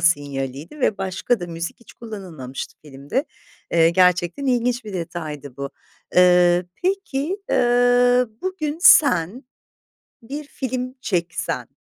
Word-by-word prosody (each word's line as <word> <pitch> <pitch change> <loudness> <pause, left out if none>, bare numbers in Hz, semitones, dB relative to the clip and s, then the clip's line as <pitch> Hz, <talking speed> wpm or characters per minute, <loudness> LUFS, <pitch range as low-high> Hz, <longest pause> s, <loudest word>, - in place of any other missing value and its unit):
sinyaliydi 145 - -1
ve 215 - +1
başka 195 +4 -1
da 175 - -4
müzik 170 +3 -6
hiç 235 - -16
kullanılmamıştı 180 - -8
filmde. 145 - -3 0.5
Eee, 165 -1 +5
gerçekten 180 +7 +2
ilginç 245 -1 +1
bir 210 - -7
detaydı 155 -6 -6
bu. 140 0 -5 0.4
Eee, 180 0 +5 0.2
peki, 370 -3 -1
eee, 245 +1 +4 0.2
bugün 345 -5 -3
sen 245 - +5 0.8
bir 285 +6 -6
film 255 -2 -4
çeksen, 180 -10 -2
190 Hz, 110 wpm, -22 LUFS, 165-250 Hz, 0.8 s, Eee